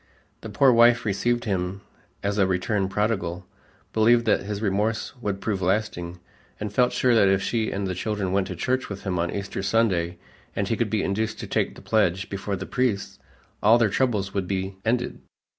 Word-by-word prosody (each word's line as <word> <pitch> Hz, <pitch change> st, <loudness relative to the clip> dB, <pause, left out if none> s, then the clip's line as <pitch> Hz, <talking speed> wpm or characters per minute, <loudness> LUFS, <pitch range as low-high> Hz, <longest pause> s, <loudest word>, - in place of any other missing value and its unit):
The -, -, -7 dB
poor 135 Hz, -2 st, +4 dB
wife 120 Hz, 0 st, +5 dB
received 115 Hz, +4 st, 0 dB
him 95 Hz, -3 st, -2 dB, 0.4 s
as 100 Hz, +1 st, 0 dB
a 95 Hz, -, +4 dB
returned 95 Hz, +1 st, 0 dB
prodigal, 95 Hz, -4 st, -1 dB, 0.5 s
believed 115 Hz, +2 st, +4 dB
that 110 Hz, -, +3 dB
his 100 Hz, +1 st, -4 dB
remorse 105 Hz, +2 st, -1 dB
would 100 Hz, -3 st, -2 dB
prove 100 Hz, -4 st, -2 dB
lasting, 90 Hz, -2 st, -1 dB, 0.4 s
and 105 Hz, -1 st, -4 dB
felt 125 Hz, +2 st, +3 dB
sure 125 Hz, -1 st, +2 dB
that 110 Hz, -4 st, +5 dB
if 95 Hz, 0 st, +2 dB
she 115 Hz, -2 st, 0 dB
and 100 Hz, 0 st, -3 dB
the 95 Hz, -, -2 dB
children 100 Hz, 0 st, -2 dB
went 95 Hz, -1 st, +1 dB
to 90 Hz, -, -5 dB
church 130 Hz, +9 st, -1 dB
with 100 Hz, -1 st, -7 dB
him 90 Hz, -3 st, -1 dB
on 85 Hz, 0 st, 0 dB
Easter 100 Hz, 0 st, -4 dB
Sunday 95 Hz, -5 st, +1 dB, 0.4 s
and -, -, -1 dB
he -, -, +1 dB
could -, -, -1 dB
be -, -, 0 dB
induced 110 Hz, +3 st, -1 dB
to -, -, -5 dB
take -, -, -1 dB
the -, -, -13 dB
pledge 95 Hz, -3 st, +1 dB
before 100 Hz, 0 st, -3 dB
the 95 Hz, 0 st, -5 dB
priest, 120 Hz, -5 st, -1 dB, 0.4 s
all 110 Hz, +3 st, +6 dB
their 115 Hz, -3 st, +3 dB
troubles 105 Hz, -4 st, 0 dB
would 95 Hz, -2 st, -1 dB
be 95 Hz, 0 st, -2 dB
ended. 120 Hz, +2 st, -1 dB
100 Hz, 195 wpm, -25 LUFS, 95-115 Hz, 0.5 s, all